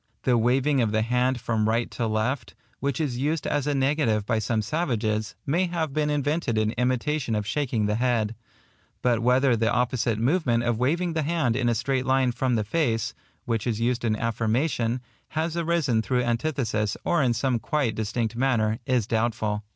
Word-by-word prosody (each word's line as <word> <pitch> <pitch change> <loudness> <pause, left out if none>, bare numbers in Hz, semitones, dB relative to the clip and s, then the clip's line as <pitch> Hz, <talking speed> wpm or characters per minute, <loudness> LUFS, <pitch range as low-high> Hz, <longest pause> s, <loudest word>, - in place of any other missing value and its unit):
The 125 - +3
waving 130 +4 +2
of 110 -3 +1
the 110 0 +1
hand 125 +2 +1
from 110 -2 0
right 115 +1 0
to 115 - -2
left, 110 +5 -2 0.2
which 140 -2 -1
is 135 -6 -1
used 150 +3 -1
as 145 -1 0
a 145 - +1
negative 135 -6 +1
by 115 0 +1
some 110 0 0
savages, 110 -7 -1
may 175 +6 +1
have 165 -4 -2
been 150 0 +1
invented 145 -4 0
in 110 0 +2
imitation 125 +1 0
of 105 -1 -1
shaking 120 -4 -1
the 105 - +1
head; 115 -4 +1 0.7
but 120 -3 +3
whether 125 +1 +3
the 115 +1 +1
opposite 120 -2 +1
movement 120 -1 +1
of 120 -2 0
waving 165 +7 +1
the 160 - 0
hand 150 -6 0
in 120 -2 +1
a 120 - +1
straight 130 +3 -1
line 130 -1 +3
from 125 +1 0
the 110 - +1
face, 115 -2 0 0.3
which 115 -1 -1
is 115 -2 -1
used 120 +1 0
in 110 -2 +1
affirmation, 115 +2 0 0.3
has 160 +1 -2
arisen 165 -9 +1
through 125 +2 0
antithesis 120 -4 -1
or 170 - +2
in 120 -3 +2
some 125 0 0
quite 135 -3 0
distinct 110 +1 -2
manner, 115 -3 +1
is 125 -5 +2
doubtful. 110 -2 -1
120 Hz, 185 wpm, -25 LUFS, 115-140 Hz, 0.7 s, The